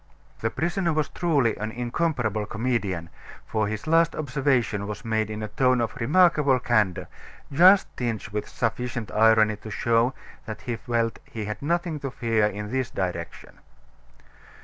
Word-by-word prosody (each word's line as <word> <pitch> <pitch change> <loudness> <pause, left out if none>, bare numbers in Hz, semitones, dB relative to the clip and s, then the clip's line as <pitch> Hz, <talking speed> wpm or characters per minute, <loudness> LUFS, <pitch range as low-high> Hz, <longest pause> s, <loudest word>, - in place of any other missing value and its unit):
The 110 - 0
prisoner 170 - -1
was 155 -2 0
truly 145 -10 +1
an 105 +1 -3
incomparable 120 - -1
comedian, 110 -8 -2 0.3
for 110 -1 -1
his 105 0 -4
last 165 +1 +3
observation 130 -8 0
was 105 +3 -6
made 110 -1 0
in 110 0 -5
a - - -3
tone 125 +3 +2
of 115 -1 -2
remarkable 150 0 +4
candor, 110 -7 +1 0.5
just 185 +6 +7
tinged 115 -5 -3
with 105 +1 -4
sufficient 120 0 -3
irony 110 -1 +4
to 110 - -10
show 115 +4 +1 0.3
that 110 -1 -6
he 120 - -3
felt 115 -1 -1
he 110 -2 -6
had 105 +1 -5
nothing 170 +1 -1
to 140 - -4
fear 115 -4 +1
in 105 +1 -5
this 130 -1 -1
direction. 90 -3 -5
115 Hz, 150 wpm, -25 LUFS, 110-140 Hz, 0.5 s, just